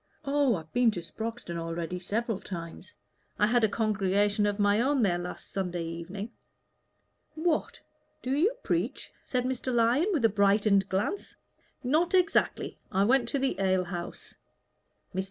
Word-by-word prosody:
"Oh, 280 -4 +3
I've 160 -2 -8
been 245 -1 +4
to - - 0
Sproxton 220 -2 -5
already 165 +1 -3
several 220 +3 -2
times. 170 0 -8 0.4
I 210 - +4
had 240 +2 +2
a 220 - +4
congregation 205 -1 +1
of 205 -1 -1
my 205 +1 +3
own 270 0 +2
there 175 -4 +2
last 180 0 -7
Sunday 180 -3 -2
evening." 175 +6 -6 1.0
"What! 320 0 -1 0.4
do 255 - -2
you 345 - +2
preach?" - - -2 0.2
said 250 -1 0
Mr. 260 0 -2
Lyon, 240 - +3
with 310 - 0
brightened 200 -1 +3
glance. 205 - -2 0.5
"Not 320 +8 +2
exactly. 360 -2 +1
I 195 -1 +3
went 240 +2 +3
to - - 0
the 270 0 0
ale 185 -1 +2
house." 175 -1 -7 0.8
Mr. 190 - -2
210 Hz, 150 wpm, -29 LUFS, 185-255 Hz, 1.0 s, been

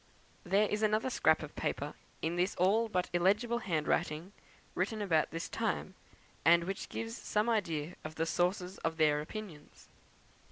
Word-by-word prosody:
There 200 +3 +3
is 210 +1 -1
another 215 +4 +2
scrap - - +3
of - - -9
paper, - - -2 0.3
in 165 +2 0
this 180 +3 +1
all 215 +6 +3
but 180 -3 0
illegible 210 +7 +2
handwriting, 165 -1 -1 0.4
written 215 +4 -1
about 165 -7 +2
this 165 +1 -4
time, 220 -4 -2 0.5
and 170 +1 +6
which 195 +3 -4
gives 225 0 -4
some 210 -1 0
idea 175 -8 0
of 155 0 -7
the 165 - 0
sources 180 +2 0
of 165 0 -2
their 150 -2 +3
opinions. 165 -3 -9
185 Hz, 155 wpm, -33 LUFS, 165-215 Hz, 0.5 s, and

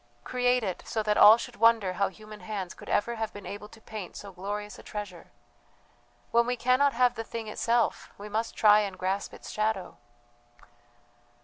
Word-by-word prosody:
Create 250 -1 +1
it 190 -4 -3
so 220 - -2
that 210 0 +1
all 215 +2 +9
should - - -8
wonder 225 -4 +4
how 200 +2 +1
human 215 +1 -11
hands 200 -5 -5
could - - -12
ever 235 +3 0
have 220 -1 -3
been 205 -1 -10
able 205 +1 -7
to 225 - -15
paint 215 -4 -8
so 200 - -8
glorious 205 +3 -6
a - - -10
treasure. 200 -5 -8 1.0
When 235 0 +3
we 250 - 0
cannot 255 +4 +3
have 245 0 +3
the 225 -1 -5
thing 225 -1 -6
itself 230 +2 0
we 205 - -8
must 220 +2 -2
try 210 -1 +6
and 200 -3 -3
grasp 190 +2 -2
its - - -10
shadow." 215 -4 -2
215 Hz, 185 wpm, -28 LUFS, 205-230 Hz, 1.0 s, all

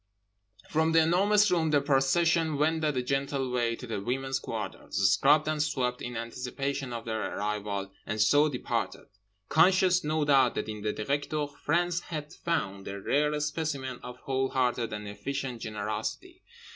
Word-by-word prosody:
From 160 +1 +1
The 165 0 +6
Enormous 200 +4 +4
Room 165 -3 +2
the 150 -1 +4
procession 155 +3 +2
wended 155 -1 +1
a 125 - 0
gentle 135 0 -1
way 120 -2 +1
to 125 - -9
the 110 -4 -4
women's 130 +4 -1
quarters - - -6 0.2
(scrubbed 150 +2 +4
and 155 -1 0
swept 125 -4 -1
in 120 -1 -5
anticipation 130 +3 -4
of 115 -1 -5
their 110 -3 -3
arrival) 100 -1 -3 0.2
and 105 - -3
so 145 +8 +5
departed; 125 -4 -3 0.4
conscious—no 175 -3 +4
doubt—that 135 -6 +3
in 105 -1 -5
the 105 +1 0
Directeur 145 +6 -1
France 175 +4 0
had 155 -3 -6
found 100 - -2
a 100 0 -5
rare 150 +8 +1
specimen 150 -4 -3
of 125 0 -8
whole 135 0 -1
hearted 125 -3 0
and 105 0 -5
efficient 125 +4 -4
generosity. 105 -2 -4
135 Hz, 150 wpm, -29 LUFS, 120-155 Hz, 0.4 s, The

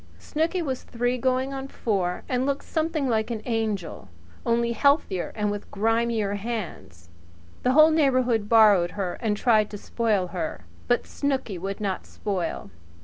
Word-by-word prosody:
Snooky 330 +3 -1
was 265 -4 -3
three 245 +1 -1
going 260 +2 0
on 270 0 -5
four, 190 -9 -2
and 250 -1 0
looked 280 +1 -1
something 315 -3 -1
like 220 -2 0
an 220 -2 -4
angel 215 - -2 0.4
only 235 0 +2
healthier 235 - +2
and 210 -1 0
with 205 0 -6
grimier 225 -1 0
hands. 195 - -6 0.5
The 255 - +2
whole 310 +2 +7
neighbourhood 255 -8 +2
borrowed 210 -6 +6
her 185 -3 -3
and 215 -3 0
tried 215 -2 +3
to 205 - -6
spoil 205 -4 0
her; 160 - -4 0.2
but 245 - +2
Snooky 265 -9 -2
would 195 +2 -4
not 195 -3 -3
spoil. 185 - -4
225 Hz, 150 wpm, -25 LUFS, 200-255 Hz, 0.5 s, whole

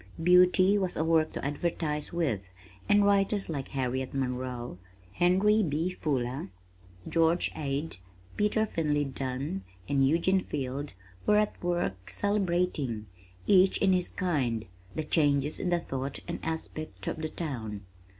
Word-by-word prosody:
Beauty 180 +3 +6
was 185 -2 -1
a 160 - +1
work 160 -1 +3
to - - -4
advertise 150 0 -2
with, 155 - 0 0.5
and 205 0 +5
writers 200 -1 +2
like 140 -4 -3
Harriet 130 0 -2
Monroe, 125 -5 -3 0.3
Henry 190 - +3
B. 165 0 0
Fuller, 130 - -2 0.6
George 165 +1 +2
Ade, 145 - -2 0.4
Peter 210 +1 +2
Finley 150 -7 0
Dunne, 130 -6 -3 0.2
and 140 -1 +2
Eugene 180 +5 +2
Field 140 0 -4 0.3
were 210 - +5
at 210 -3 0
work 175 - -1
celebrating, 175 - 0 0.4
each 190 -1 +5
in 195 -1 +3
his 180 -1 +1
kind, 130 - -1 0.3
the 155 - -1
changes 145 -2 +2
in 180 - -1
the 175 -1 +2
thought 135 -2 -4
and - - -4
aspect 160 -1 -5
of - - -2
the 155 0 -3
town. 115 - -5
155 Hz, 135 wpm, -29 LUFS, 135-180 Hz, 0.6 s, Beauty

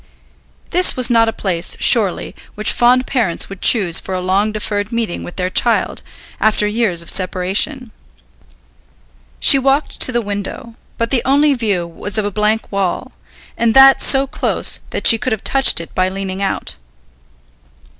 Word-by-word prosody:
This 365 +1 +3
was 250 -1 +1
not 230 -1 +3
a - - -2
place, 185 -6 -2
surely, 205 -7 +1 0.2
which 215 - -1
fond 250 +1 +2
parents 230 -12 -1
would 195 -1 -11
choose 190 -8 +3
for 190 - -6
a - - -3
long 195 +4 -1
deferred 210 -1 -4
meeting 230 -6 -4
with 175 - -10
their 185 0 -3
child, 235 +5 0 0.4
after 215 -1 +2
years 210 -5 -1
of - - -12
separation. 195 +8 0 1.5
She 275 - +6
walked 275 +3 -1
to - - +1
the 240 - -1
window, 205 +3 -7 0.2
but 230 0 -3
the 255 -3 +1
only 285 +2 +2
view 205 -8 -2
was 195 +5 -3
of 215 - -1
a 205 - -3
blank 215 +2 -2
wall, 195 -3 -3 0.4
and 230 -1 0
that 270 0 +6
so 270 0 +4
close 275 - -1
that - - -6
she 225 - +6
could 255 - -2
have 215 - -6
touched 270 -8 +4
it 165 - -10
by 185 0 0
leaning 190 0 -6
out. 195 - -4
215 Hz, 165 wpm, -15 LUFS, 190-245 Hz, 1.5 s, She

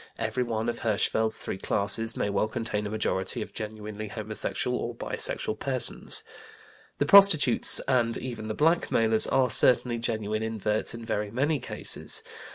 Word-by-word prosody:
Everyone 115 -3 -2
of 120 - -3
Hirschfeld's 110 0 0
three 95 - -6
classes 110 +4 +1
may - - -1
well 100 +1 0
contain 110 -2 -3
a - - -6
majority 110 +1 -2
of - - -14
genuinely 110 0 -6
homosexual 110 0 -3
or - - -5
bisexual 110 - -2
persons. 130 -2 -1 0.7
The 145 - 0
prostitutes 170 -8 +6
and 120 -3 +1
even 115 -4 -7
the 110 - -4
blackmailers 115 -9 +3
are 130 -3 +1
certainly 120 +1 +4
genuine 110 -2 -3
inverts 110 0 -2
in 115 0 -9
very 105 -2 -3
many 140 +7 -1
cases. - - -4
110 Hz, 145 wpm, -26 LUFS, 110-125 Hz, 0.7 s, prostitutes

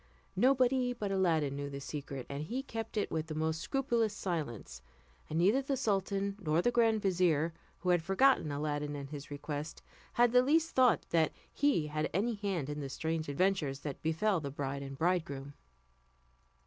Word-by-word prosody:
Nobody 255 +2 +3
but 210 -5 -3
Aladdin 165 -7 +1
knew 140 0 -4
the 140 0 -6
secret, 140 -2 -6
and 140 +1 -5
he 255 +10 -3
kept 225 -4 -5
it 205 - 0
with 160 0 -2
the 155 - -5
most 160 +1 -1
scrupulous 235 -5 0
silence; 130 - -4 0.5
and 155 - -2
neither 200 +10 +4
the 275 0 -1
sultan 200 -3 0
nor 155 -2 +1
the 240 +7 +2
grand 225 -3 +3
vizier, 170 -4 +2 0.3
who 185 - -1
had 175 -1 +4
forgotten 195 - +3
Aladdin 145 0 -2
and 140 0 -7
his 145 -2 -7
request, 145 +1 -5 0.3
had 240 0 +4
the 250 +1 +6
least 320 +5 +2
thought 255 -3 +4
that 160 -2 +3 0.2
he 285 - +2
had 155 0 -2
any 225 +5 +1
hand 195 -8 -2
in 150 0 -4
the 140 -2 -4
strange 160 +2 -2
adventures 145 -3 0
that 145 -3 -5
befell 170 +5 +1
the 145 -3 -4
bride 140 0 -4
and 135 -1 -7
bridegroom. 160 -5 -1
165 Hz, 175 wpm, -33 LUFS, 145-215 Hz, 0.5 s, the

